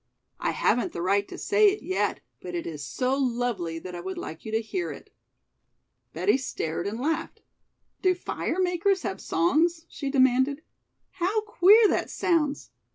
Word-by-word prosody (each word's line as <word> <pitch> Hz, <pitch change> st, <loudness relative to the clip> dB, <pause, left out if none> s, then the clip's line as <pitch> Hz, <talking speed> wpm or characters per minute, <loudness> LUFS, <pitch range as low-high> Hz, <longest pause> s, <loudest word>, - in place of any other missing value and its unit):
"I -, -, 0 dB
haven't 245 Hz, -, +1 dB
the 170 Hz, -, -4 dB
right 200 Hz, +2 st, +2 dB
to -, -, -9 dB
say 420 Hz, +1 st, +4 dB
it 405 Hz, +2 st, -4 dB
yet, 375 Hz, +2 st, -1 dB, 0.2 s
but -, -, -6 dB
it 340 Hz, -, -3 dB
is 150 Hz, -3 st, -6 dB
so 255 Hz, -, -1 dB
lovely 240 Hz, -10 st, -1 dB
that 180 Hz, +2 st, -8 dB
I 175 Hz, -, -5 dB
would 190 Hz, +2 st, -5 dB
like 160 Hz, +1 st, -7 dB
you 220 Hz, -, -5 dB
to 220 Hz, -, +2 dB
hear 355 Hz, -, -3 dB
it." -, -, -12 dB, 1.0 s
Betty 410 Hz, -, +2 dB
stared 170 Hz, -8 st, -3 dB
and 220 Hz, +3 st, -4 dB
laughed. 310 Hz, +5 st, -2 dB, 0.6 s
"Do 370 Hz, -1 st, +3 dB
fire 350 Hz, 0 st, -3 dB
makers 365 Hz, +1 st, +1 dB
have 190 Hz, -, -4 dB
songs?" 320 Hz, -, +1 dB
she 280 Hz, -, -4 dB
demanded. 265 Hz, +2 st, +3 dB, 0.5 s
"How 390 Hz, +5 st, 0 dB
queer 430 Hz, +1 st, +6 dB
that -, -, 0 dB
sounds! 305 Hz, -5 st, 0 dB
275 Hz, 165 wpm, -26 LUFS, -, 1.0 s, queer